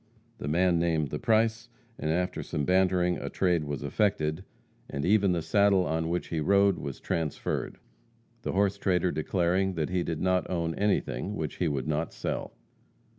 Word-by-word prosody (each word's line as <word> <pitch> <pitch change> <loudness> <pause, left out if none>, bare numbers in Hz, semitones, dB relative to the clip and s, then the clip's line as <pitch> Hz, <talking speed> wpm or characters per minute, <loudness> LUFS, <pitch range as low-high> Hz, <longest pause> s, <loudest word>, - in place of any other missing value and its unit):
The - - -5
man 85 +2 +3
named 80 -4 0
the - - -3
price, 115 0 +1 0.3
and, 75 - -2
after 90 +3 0
some 75 - -3
bantering, 90 0 +2
a - - -4
trade 90 -4 +1
was 70 -1 -4
effected, 80 -1 0 0.5
and 70 +1 -3
even 100 0 +4
the 85 -2 -1
saddle 100 -2 +3
on 80 0 -1
which 90 +1 -2
he 80 - -1
rode 100 +4 +3
was 70 -2 -6
transferred, 80 -3 -2 0.6
the - - -3
horse 100 +1 +1
trader 90 -2 +1
declaring 90 +4 0
that 80 -2 -1
he 90 -1 +1
did 80 -2 -3
not 90 -2 +1
own 85 -2 -1
anything 105 0 -1
which 80 -6 -4
he 90 - +1
would 70 -2 -2
not 80 +1 -1
sell. - - -4
90 Hz, 175 wpm, -28 LUFS, 80-95 Hz, 0.6 s, even